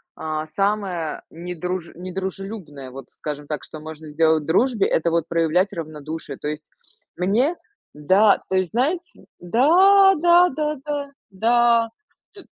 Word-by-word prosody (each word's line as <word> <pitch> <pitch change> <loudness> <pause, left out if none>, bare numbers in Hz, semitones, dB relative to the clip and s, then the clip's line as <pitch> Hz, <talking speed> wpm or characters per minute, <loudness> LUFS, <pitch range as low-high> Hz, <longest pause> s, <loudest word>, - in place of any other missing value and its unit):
а, 155 0 -4
самое 195 -3 -2
недруж 180 +1 -5
недружелюбное, 185 -5 -6
вот, 135 +1 -10
скажем 150 -1 -7
так, 150 -2 -4
что 155 - -10
можно 155 0 -9
сделать 160 0 +2
в - - -12
дружбе- 220 - +2
это 165 +1 +1
вот 165 -1 0
проявлять 170 +4 +1
равнодушие. 155 -3 -7
То - - -6
есть, 150 0 -5 0.5
мне 225 - +1 0.4
да. 190 +8 +4
То 190 - 0
есть, 185 -2 0
знаете, 320 +9 -2
да! 370 - +5
Да 345 +2 +5
да 300 +2 -2
да 290 -1 -2 0.3
да! 230 +3 +3 0.4
Т 400 - -13
185 Hz, 140 wpm, -22 LUFS, 155-235 Hz, 0.5 s, да